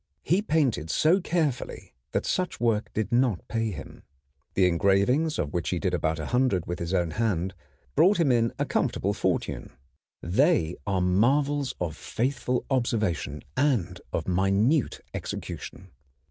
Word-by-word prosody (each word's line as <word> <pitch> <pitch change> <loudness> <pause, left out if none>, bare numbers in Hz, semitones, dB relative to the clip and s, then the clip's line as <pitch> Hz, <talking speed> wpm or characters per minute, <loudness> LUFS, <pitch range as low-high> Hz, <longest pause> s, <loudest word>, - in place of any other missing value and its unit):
He 180 +6 +2
painted 140 - +1
so 165 - +3
carefully 160 -8 -2 0.2
that - - -1
such 185 -1 -1
work 115 -3 +1
did 110 +3 -2
not 120 -5 +1
pay 115 -1 -1
him. 95 - -8 0.5
The 95 - +4
engravings, 100 - +2
of 75 -2 -2
which 85 -2 -1
he 90 - 0
did 90 +1 -1
about 80 -2 0
100 95 - +1
with 85 - -4
his 85 0 -3
own 90 -4 +1
hand, 95 -4 -1 0.4
brought 190 +2 +5
him 155 -6 +4
in 115 -1 +2
a - - 0
comfortable - - 0
fortune. - - -2 0.5
They 85 -1 +2
are 95 -2 +1
marvels 135 +10 +2
of 85 -4 -2
faithful 125 - -2
observation 105 - 0
and 105 - +1
of - - -2
minute 100 - +2
execution. - - -6
110 Hz, 145 wpm, -27 LUFS, 90-135 Hz, 0.5 s, brought